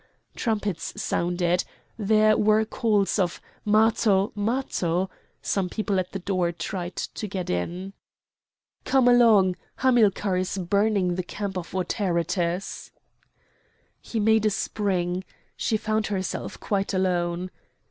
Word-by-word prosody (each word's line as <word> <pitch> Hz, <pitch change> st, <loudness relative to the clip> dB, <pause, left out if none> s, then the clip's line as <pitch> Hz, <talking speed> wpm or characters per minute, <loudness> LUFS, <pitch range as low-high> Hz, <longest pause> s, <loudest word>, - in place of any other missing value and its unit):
Trumpets 205 Hz, -7 st, -2 dB
sounded. 175 Hz, 0 st, 0 dB, 0.3 s
There 215 Hz, 0 st, +4 dB
were 215 Hz, +1 st, +3 dB
calls 215 Hz, -3 st, +1 dB
of 175 Hz, -3 st, 0 dB, 0.2 s
"Matho! 215 Hz, -2 st, +3 dB
Matho!" 200 Hz, -5 st, -1 dB, 0.3 s
Some 190 Hz, -3 st, 0 dB
people 205 Hz, -2 st, -1 dB
at 180 Hz, -, -3 dB
the -, -, -3 dB
door 185 Hz, -2 st, 0 dB
tried 175 Hz, +1 st, -5 dB
to 215 Hz, -, -4 dB
get 190 Hz, -2 st, -3 dB
in. 175 Hz, -, -3 dB, 0.9 s
"Come 265 Hz, -2 st, +3 dB
along! 220 Hz, -7 st, +5 dB, 0.2 s
Hamilcar 215 Hz, -7 st, +3 dB
is 185 Hz, +1 st, -2 dB
burning 200 Hz, 0 st, +1 dB
the 185 Hz, -, -1 dB
camp 200 Hz, +2 st, -5 dB
of 180 Hz, 0 st, -5 dB
Autaritus!" 180 Hz, -1 st, -1 dB, 1.1 s
He 230 Hz, -, -4 dB
made 220 Hz, 0 st, +4 dB
a -, -, +4 dB
spring. 185 Hz, -3 st, -1 dB, 0.3 s
She 220 Hz, -, 0 dB
found 215 Hz, 0 st, -1 dB
herself 190 Hz, -3 st, -3 dB
quite 200 Hz, -1 st, -1 dB
alone. 180 Hz, -1 st, 0 dB
195 Hz, 115 wpm, -25 LUFS, 180-215 Hz, 1.1 s, along